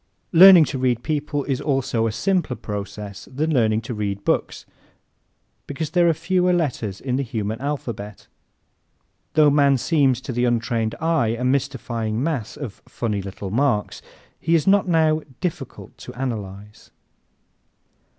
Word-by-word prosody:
Learning 180 -1 +9
to 135 -2 -4
read 125 -2 0
people 145 -2 -2
is 135 -1 -2
also 135 -5 0
a - - -1
simpler 180 - 0
process 105 -1 -7
than 155 +4 -1
learning 110 -4 +2
to 115 - -6
read 100 -2 -4
books - - -1 1.0
because 150 +2 -4
there 175 0 +4
are - - +3
fewer 180 +2 +1
letters 125 - -1
in 130 -1 -2
the - - 0
human 110 -3 -4
alphabet. 120 -8 -5 1.1
Though 150 -2 +5
man 140 -1 +4
seems 135 -3 +2
to 130 - -5
the 120 +1 +1
untrained 115 -2 0
eye 155 -9 +1
a 125 - -4
mystifying 120 -3 -1
mass 145 -9 -3
of 130 -9 -8
"funny 105 -4 -3
little 95 0 -7
marks," 120 -3 0 0.4
he 165 +1 +1
is 160 - +2
not 195 0 +4
now 160 -2 +2 0.2
difficult 180 -3 -5
to - - -9
analyze. 105 -5 -6
130 Hz, 145 wpm, -22 LUFS, 110-155 Hz, 1.1 s, Learning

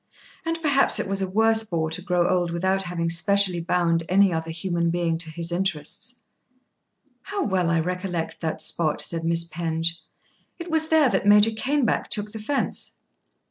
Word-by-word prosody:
And 330 0 -2
perhaps 280 -3 +3
it - - -2
was 195 0 -2
a 190 - -2
worse 220 +3 +3
bore 165 -6 -2
to 165 - -4
grow 180 -1 +1
old 180 -2 +1
without 190 +3 0
having 175 -2 -3
specially 180 +2 +2
bound 170 -1 +1
any 195 0 +4
other 160 0 -3
human 170 0 -1
being 170 -1 0
to 165 -1 -3
his 170 +1 -3
interests. 190 +6 -3 1.0
"How 405 -1 -3
well 185 -4 0
I 165 -1 +2
recollect 175 -2 -3
that 160 -2 -2
spot," 155 -3 +1
said 165 -1 +1
Miss 165 0 +1
Penge. 165 0 -3 0.6
"It 340 -1 -7
was 320 0 +1
there 315 -4 +4
that 205 - 0
Major 210 +2 +6
Caneback 270 +4 0
took 210 -1 -1
the 220 - -7
fence." 275 +7 -1
180 Hz, 175 wpm, -24 LUFS, 165-210 Hz, 1.0 s, Major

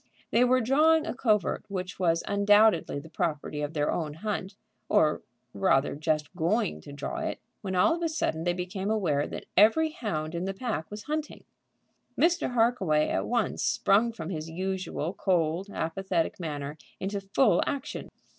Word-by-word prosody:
They 235 - +4
were 255 +1 +4
drawing 310 +6 +4
a - - -3
covert 215 -7 +1
which 185 -2 -5
was 165 -2 +2
undoubtedly 205 -4 +4
the 145 - -7
property 155 -3 -2
of 150 +2 -4
their 150 -1 +1
own 150 -3 -3
hunt, 195 +1 -4 0.3
or 150 -1 +3 0.3
rather 135 +7 +2
just 155 +1 -1
going 160 - 0
to - - -11
draw 140 0 -5
it, - - -3 0.2
when 190 -2 -3
all 180 - +4
of - - -8
a 335 - +1
sudden 165 - -1
they 175 0 +1
became 185 +2 -4
aware 165 -10 +1
that - - -7
every 225 +11 +5
hound 165 - -3
in 170 +2 -2
the 195 0 -3
pack 215 -8 -3
was 210 0 -7
hunting. 305 +2 -4 0.8
Mr. 340 -6 +2
Harkaway 195 -11 +2
at - - -1
once 235 -3 0
sprung 220 +4 +3
from 175 -5 -6
his 160 -2 -4
usual 185 -1 -3
cold, 180 0 0
apathetic 170 0 -1
manner 150 -2 -5 0.2
into 200 +1 -3
full 195 0 +3
action. 285 +1 -4
190 Hz, 165 wpm, -28 LUFS, 160-220 Hz, 0.8 s, every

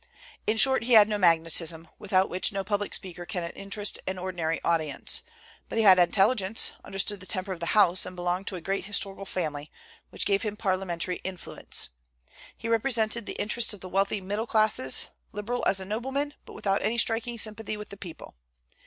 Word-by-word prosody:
In 220 - +2
short, 265 0 +5
he 245 - +2
had 215 -2 +9
no 210 -1 -1
magnetism, 165 -1 +2
without 190 -1 +2
which 185 +4 +2
no 195 -1 -2
public 205 +1 -2
speaker 175 -2 -6
can 180 -1 -4
interest 205 +1 +1
an 190 0 -2
ordinary 175 -3 -2
audience; 160 -4 0 0.5
but - - -4
he 225 - +3
had 190 -3 +8
intelligence, 195 +4 +3
understood 200 +1 -2
the 185 - -10
temper 190 -1 -2
of 175 - -9
the 170 +5 -1
House, 185 -3 +5
and 180 - -5
belonged 180 +2 -2
to 190 - -1
a 180 - -6
great 195 +3 -2
historical 195 -1 -1
family, 150 -6 -4 0.4
which - - -3
gave 200 -1 +2
him 210 -1 -4
parliamentary 185 -3 -1
influence. 185 -2 -4 0.7
He - - -6
represented 230 -1 +1
the - - -5
interests 220 +1 +1
of 195 - -16
the 185 - -7
wealthy 195 +2 +1
middle 205 +5 -3
classes, 215 -13 +3 0.3
liberal 220 +4 -3
as 195 - +3
a 190 - -4
nobleman, 265 +8 -2
but - - -11
without 195 0 0
any 230 +2 0
striking 235 +1 0
sympathy 215 -1 -3
with 210 0 -8
the - - -8
people. 180 -4 -10
195 Hz, 190 wpm, -27 LUFS, 180-215 Hz, 0.7 s, had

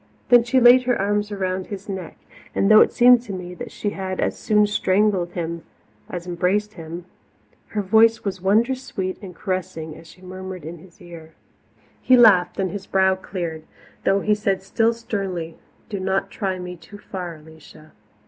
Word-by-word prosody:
Then 240 -1 +7
she 250 +2 +2
laid 250 +1 +7
her 245 -1 +1
arms 205 +1 0
about 185 -2 -3
his 200 -1 -8
neck 190 -4 -6 0.4
and 195 - +2
though 215 - +9
it - - +4
seemed 245 0 +6
to 210 -5 -8
me 180 -1 -6
that 245 +6 -8
she 205 - -3
had 190 -1 -5
as - - 0
soon 210 -1 +2
strangled 195 -3 +1 0.8
as 175 -1 -6
embraced 185 +4 -1
him 165 0 -8 0.6
her 210 -1 -3
voice 225 +3 +4
was 195 -2 -4
wondrous 230 +7 +2
sweet 185 -7 -4
and 185 -4 -10
caressing 185 -5 -4
as 165 - -14
she 180 +3 -17
murmured 185 -2 -8
in 165 +1 -8
his 175 +1 -18
ear. 165 -2 -12 0.7
He 255 - +5
laughed 200 -7 +5
and 190 -2 -1
his 200 -1 -7
brow 190 0 +3
cleared, 175 -4 -5 0.4
though 195 +1 +2
he 210 - +2
said 195 -2 -1
still 225 +4 +1
sternly, 195 -8 -5 0.3
"Do 200 - -5
not 190 +1 -1
try 190 -3 -3
me 180 0 -7
too 205 +4 -13
far, 180 -4 -7
Alicia." 155 0 -16
190 Hz, 175 wpm, -22 LUFS, 180-210 Hz, 0.8 s, though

